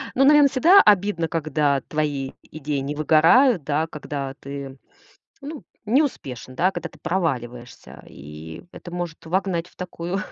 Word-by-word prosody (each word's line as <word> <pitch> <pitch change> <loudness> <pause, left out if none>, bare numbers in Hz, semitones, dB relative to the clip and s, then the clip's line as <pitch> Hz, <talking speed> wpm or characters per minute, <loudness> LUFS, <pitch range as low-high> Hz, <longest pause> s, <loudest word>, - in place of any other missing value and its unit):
Ну, 270 - +4
наверно, 295 0 +7
всегда 340 +10 +6
обидно, 200 -4 +2
когда 150 -4 0
твои 145 -3 -3 0.2
идеи 150 -2 -3
не 140 +2 -4
выгорают, 165 - +4
да? 150 +3 -1
Когда 140 -3 -6
ты, 140 -1 -8 0.6
ну, 290 +1 -8 0.2
не 250 +8 +3
успешен, 130 - -5
да? 180 +8 +2
Когда 165 - -6
ты 150 - -20
проваливаешься. 125 -9 -4
И 75 +3 -11
это 175 - -10
может 175 -2 -6
вогнать 175 -1 -1
в - - -27
такую 180 +1 -5
160 Hz, 145 wpm, -23 LUFS, 140-190 Hz, 0.6 s, наверно